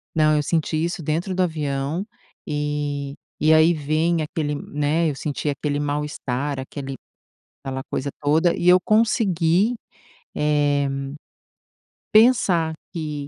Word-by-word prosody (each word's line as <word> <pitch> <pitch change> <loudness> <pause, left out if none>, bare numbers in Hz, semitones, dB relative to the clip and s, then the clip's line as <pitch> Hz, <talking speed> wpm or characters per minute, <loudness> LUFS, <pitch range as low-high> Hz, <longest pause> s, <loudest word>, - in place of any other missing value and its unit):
Não, 155 -1 +4
eu 150 - +1
senti 155 0 0
isso 170 0 -3
dentro 165 +5 -1
do 185 - +1
avião, 150 0 -2 0.4
e 145 -1 -2 0.3
e 155 +1 +6
aí 160 +2 +6
vem 155 +2 0
aquele 150 -1 -2
né, 150 +3 0
eu 150 - -1
senti 145 +2 -3
aquele 145 0 -1
mal-estar, 145 -2 -2
aquele 135 0 -6 0.7
aquela 135 -1 -4
coisa 140 - -2
toda, 160 +4 +3
e 175 - +2
eu 180 +1 +7
consegui, 205 -1 +2 0.6
eh, 145 -1 +2 1.2
pensar 205 -8 +4 0.2
que 150 -4 -4
150 Hz, 120 wpm, -22 LUFS, 145-170 Hz, 1.2 s, eu